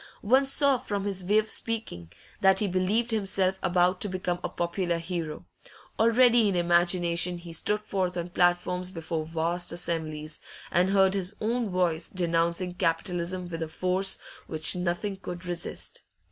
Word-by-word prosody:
One 260 +6 +4
saw 275 -1 +3
from 205 -3 -3
his 195 -2 0
way 205 +4 +3
of 215 0 +2
speaking, 215 - -3 0.3
that 190 0 +5
he 210 - +3
believed 200 +6 0
himself 195 -3 +1
about 180 0 +2
to 205 - -1
become 180 -1 -2
a - - -2
popular 175 0 -1
hero; 165 -2 -4 0.5
already 235 0 +5
in 195 - -1
imagination 175 0 +2
he 170 -1 -10
stood 210 +6 -1
forth 185 -3 -2
on 175 0 -3
platforms 180 +1 +1
before 165 -3 -4
vast 165 +2 -2
assemblies, 155 -3 -3 0.3
and 180 +2 +3
heard 195 -1 +4
his 195 +1 -2
own 230 +1 -1
voice 175 -3 0
denouncing 170 0 0
capitalism 175 +1 -1
with 165 -2 -4
force 185 +2 +1 0.3
which 155 +1 0
nothing 180 +3 -2
could 180 -2 -7
resist. 175 -1 -4
180 Hz, 150 wpm, -27 LUFS, 170-195 Hz, 0.5 s, that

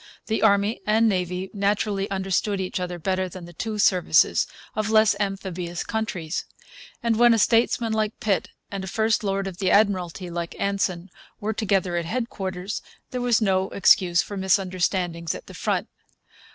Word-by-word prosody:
The 220 - -1
Army 200 +2 +3
and 220 +2 +4
Navy 180 -1 -1
naturally 200 0 0
understood 195 +1 -1
each 185 0 -2
other 180 -1 -4
better 185 +2 -1
than 180 -1 -9
the 175 - -12
two 220 +5 -4
services 180 -5 +3 0.3
of 215 0 -1
less 220 -1 +5
amphibious 190 -3 -3
countries; 190 -8 -3 0.6
and 230 -2 +2
when 240 -1 +6
a - - +1
statesman 230 +1 +2
like 215 0 -1
Pitt 210 -5 0 0.2
and 195 -1 -4
a - - -6
first 220 +3 +1
lord 195 -1 -1
of 190 -2 -6
the 190 -2 +1
Admiralty 185 -4 +1
like 170 0 -4
Anson 195 -2 -1 0.3
were 215 +1 -2
together 195 -5 0
at 170 - -2
headquarters 195 -3 -3 0.3
there 250 - -3
was 240 -2 +2
no 190 -1 +1
excuse 180 -2 +4
for 205 - -7
misunderstandings 185 -3 0
at - - -9
the - - -12
front. - - -1
195 Hz, 165 wpm, -24 LUFS, 180-215 Hz, 0.6 s, when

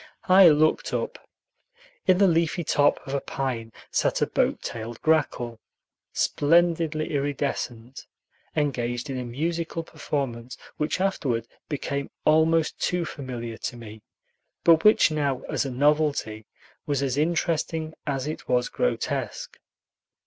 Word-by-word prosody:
I 185 -1 +8
looked 155 +1 +2
up. - - -3 0.9
In 185 -1 +5
the 200 0 +5
leafy 170 0 +1
top 145 -1 +3
of 135 - -6
a 140 - 0
pine 120 -4 -3 0.2
sat - - +1
a - - +3
boat - - 0
tailed 115 0 -6
grackle, 125 -7 +1 0.5
splendidly 165 0 +2
iridescent, 135 -4 -3 0.5
engaged 125 -3 -1
in 130 - -3
a - - -3
musical 165 +7 -3
performance 135 -6 -4 0.2
which 150 +3 -1
afterward 140 - 0 0.2
became 140 -1 -3 0.2
almost 160 +1 +3
too 180 -1 0
familiar 120 -6 -6
to 120 - -5
me, 110 -2 -10 0.6
but 165 -1 +6
which 210 -5 +6
now, 140 -4 0
as - - -2
a - - -2
novelty, 140 -5 +1 0.4
was 140 -2 0
as 130 -2 0
interesting 160 0 0
as 135 -2 -1
it 155 +1 -6
was 125 -1 +2
grotesque. - - -2
145 Hz, 125 wpm, -25 LUFS, 125-160 Hz, 0.9 s, I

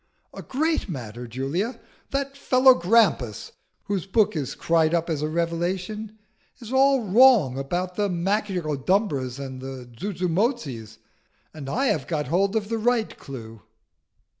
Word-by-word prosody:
"A - - -8
great 310 -2 -1
matter, 120 -5 -6
Julia. 140 - -3 0.3
That 275 0 -2
fellow 260 -1 +5
Grampus, 175 - +2 0.3
whose 195 -3 -3
book 215 0 +2
is 145 -5 -3
cried 165 0 +2
up 170 0 -1
as 150 -2 -2
a 150 - 0
revelation, 180 +6 -2 0.4
is 240 0 -8
all 270 -1 +4
wrong 210 - +5
about 175 +6 -2
the 205 -1 +1
Magicodumbras 175 - -1
and 130 -2 -7
the 130 -2 -7
Zuzumotzis, 180 - -2 0.6
and 145 -4 -7
I 260 - 0
have 210 -6 0
got 150 -5 -2
hold 195 +5 +1
of 215 -2 0
the 230 -1 -1
right 235 -1 +1
clue." 115 -5 -10
180 Hz, 140 wpm, -24 LUFS, 140-220 Hz, 0.6 s, fellow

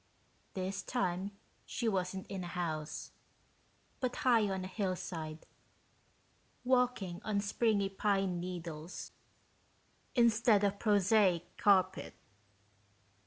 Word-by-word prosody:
This 190 +1 -2
time 190 -5 -1 0.3
she 235 - -3
wasn't 190 -2 -1
in 190 -2 -5
a - - -5
house, 160 -4 -4 0.9
but 255 -2 -1
high 235 -7 +3
on 190 -1 -2
a - - -4
hillside, 180 -5 -4 1.2
walking 250 -8 +1
on 210 -2 0
springy 205 0 +1
pine 195 -2 0
needles 170 -2 -6 1.0
instead 230 -3 +4
of 200 0 +1
prosaic 205 -4 +3
carpet. 190 -2 +3
195 Hz, 95 wpm, -34 LUFS, 180-215 Hz, 1.2 s, instead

